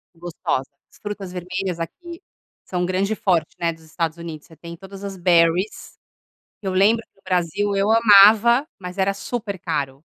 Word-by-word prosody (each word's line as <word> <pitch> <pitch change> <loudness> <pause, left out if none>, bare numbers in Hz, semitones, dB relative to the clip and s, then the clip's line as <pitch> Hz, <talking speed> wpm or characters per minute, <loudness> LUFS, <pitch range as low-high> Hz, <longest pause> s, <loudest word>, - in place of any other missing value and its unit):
Gostosas. 165 -5 -3 0.2
As - - -20
frutas 205 -3 -6
vermelhas 180 0 -4
aqui 335 - -7 0.4
são 180 -1 -2
o - - +1
grande 190 +4 0
forte, 180 -6 0
né, 170 -1 +1
dos 165 0 -18
Estados 160 0 -3
Unidos. 165 -3 -8
Você 160 - -17
tem 170 +2 -9
todas 195 +2 -12
as 200 -1 -5
berries. 175 +2 +1 0.7
Eu 190 -2 -2
lembro 210 +5 +3
que - - -55
no 195 - -29
Brasil 185 +2 -1
eu 195 +1 +1
amava, 225 +3 +6
mas 180 0 -8
era 195 +1 +1
super 205 -1 -5
caro. 145 -5 -3
185 Hz, 170 wpm, -22 LUFS, 170-200 Hz, 0.7 s, amava